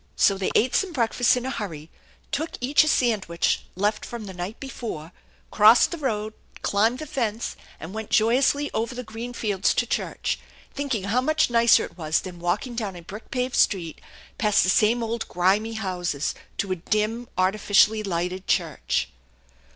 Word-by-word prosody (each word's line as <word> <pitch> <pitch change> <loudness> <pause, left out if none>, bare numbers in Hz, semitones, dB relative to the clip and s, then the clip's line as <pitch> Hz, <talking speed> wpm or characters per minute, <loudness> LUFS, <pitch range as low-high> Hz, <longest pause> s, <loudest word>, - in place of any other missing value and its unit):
So 195 - +4
they 190 -1 -1
ate 250 +3 +3
some 380 -3 +1
breakfast 245 -1 +2
in 250 - -3
a 265 - -2
hurry, 165 - -6 0.4
took 315 +3 -2
each 275 +5 +4
a - - -2
sand 235 -9 +2
wich 170 0 0
left 205 +3 0
from 235 -3 -7
the 190 - -8
night 180 +5 -6
before, 225 - -6 0.4
crossed 220 +3 +6
the 340 - -5
road, 215 -6 -2 0.3
climbed 220 +5 +2
the 310 - -6
fence, 235 -5 -2 0.2
and 160 +4 -8
went 220 -1 -5
joyously 265 +6 +3
over 230 +3 -2
the 250 - -5
green 225 +2 -7
fields 205 -5 0
to 245 - +2
church, - - -2 0.3
thinking 270 -8 -2
how 220 +6 +1
much 310 -1 +2
nicer 235 0 +5
it 170 - -14
was 155 -1 +1
than 180 -2 -9
walking 180 +9 -1
down 215 -5 -3
a 175 - -10
brick 205 +6 -10
paved 250 -1 -2
street, 170 -6 +1 0.4
past 210 -2 +3
the 185 - +1
same 230 +4 +3
old 230 0 -3
grimy 200 +5 +1
houses 180 -8 -2 0.2
to 195 - -2
a 185 - 0
dim, 215 +6 -1
arti 185 +3 +2
ficially 215 +2 +4
lighted 180 0 -3
church. - - 0
215 Hz, 180 wpm, -24 LUFS, 190-245 Hz, 0.4 s, crossed